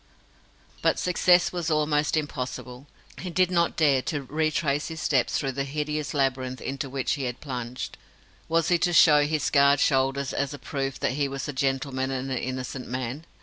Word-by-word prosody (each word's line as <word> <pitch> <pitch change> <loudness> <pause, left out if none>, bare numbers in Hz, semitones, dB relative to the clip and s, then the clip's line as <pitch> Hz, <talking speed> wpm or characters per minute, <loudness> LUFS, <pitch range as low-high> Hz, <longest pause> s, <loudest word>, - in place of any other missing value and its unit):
But - - +2
success 180 0 +3
was 175 -2 -2
almost 150 0 +1
impossible. 130 -2 -5 0.3
He 185 - -5
did 185 +1 +2
not 170 -1 +2
dare 140 -5 +4
to 145 +1 -3
retrace 150 0 0
his 160 -1 -6
steps 135 -5 +1
through 135 - -1
the 140 +1 -2
hideous 150 +1 -3
labyrinth 130 -2 0
into 135 0 -4
which 135 -1 -2
he 140 -3 -3
had 125 -1 -4
plunged. 125 -3 -6 0.5
Was 165 0 +2
he 175 -1 +3
to 175 - +1
show 150 -3 +6
his 155 -1 -1
scarred 140 -1 +4
shoulders 135 -1 +1
as 140 0 -2
a - - -9
proof 135 -2 -4
that - - +1
he 140 +1 0
was 135 +1 -5
a 145 - -4
gentleman 135 0 -1
and 135 0 -3
an 130 - -1
innocent 130 0 -5
man? 130 +5 -4
140 Hz, 185 wpm, -26 LUFS, 130-155 Hz, 0.5 s, show